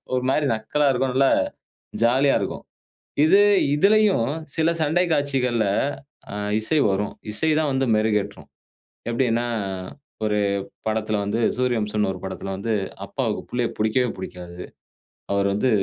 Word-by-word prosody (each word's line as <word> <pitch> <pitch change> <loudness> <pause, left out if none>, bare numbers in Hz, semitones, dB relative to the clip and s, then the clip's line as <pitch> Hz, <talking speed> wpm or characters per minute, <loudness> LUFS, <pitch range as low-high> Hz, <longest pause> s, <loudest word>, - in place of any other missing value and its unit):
ஒரு 125 - 0
மாரி 150 +1 +1
நக்கலா 140 +7 0
இருக்கும். 130 0 0
நல்லா 135 0 +4 0.7
ஜாலியா 130 +4 +4
இருக்கும். - - -4 0.6
இது 195 +6 +6 0.3
இதிலயும் 200 - +3 0.3
சில 160 0 +2
சண்டை 160 +4 +2
காட்சிகள்ல 125 -6 +1 0.7
அ - - -5 0.3
இசை 150 +8 +1
வரும். 100 +2 -1 0.2
இசை 160 +9 +1
தான் 155 -2 +1
வந்து 135 0 +1
மெருகேற்றும். 110 -1 -1 0.6
எப்படின்னா, 120 -1 +1 0.8
ஒரு 105 -1 +1 0.5
படத்தில 110 -1 0
வந்து, 105 +3 -1 0.2
சூரியவம்சம்ன்னு 105 -5 0
ஒரு 90 - -9
படத்தில 95 +1 -5
வந்து 110 +4 -2 0.3
அப்பாவுக்கு - - -2
பிள்ளைய 120 -1 0
புடிக்கவே 110 +4 +1
புடிக்காது. 90 -2 -8 0.7
அவர் 100 0 +2
வந்து, 105 +6 +1
120 Hz, 125 wpm, -23 LUFS, 105-135 Hz, 0.8 s, இது